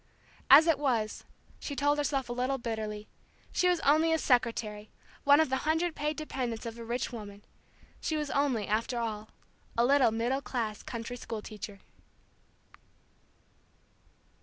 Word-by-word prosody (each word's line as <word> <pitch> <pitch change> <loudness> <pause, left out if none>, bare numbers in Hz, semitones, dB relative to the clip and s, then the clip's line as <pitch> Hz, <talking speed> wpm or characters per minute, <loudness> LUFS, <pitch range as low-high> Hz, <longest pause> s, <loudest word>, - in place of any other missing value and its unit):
As 295 +4 +10
it 325 -5 +3
was, 235 -7 -1 0.3
she 285 - -5
told 290 +1 +2
herself 275 -3 0
a 240 - -3
little 255 +2 0
bitterly, 215 -3 -4 0.4
she 360 0 +2
was 355 -2 +2
only 315 +3 +4
a 320 - +3
secretary, 230 -6 0 0.4
one 285 +1 +7
of 315 - +3
the 265 - +1
hundred 320 +4 0
paid 300 0 -2
dependents 250 -7 -4
of 230 0 -6
a - - -6
rich 235 +1 -2
woman. 205 -3 -9 0.5
She 315 - -1
was 300 -2 -3
only, 270 -7 +1
after 225 +4 0
all, 220 -2 -3 0.5
a 235 - +4
little 275 -1 +5
middle 235 +5 -1
class 225 -6 -3
country 235 +1 -6
school 225 -3 -6
teacher. 205 -2 -8
245 Hz, 150 wpm, -30 LUFS, 225-290 Hz, 0.5 s, As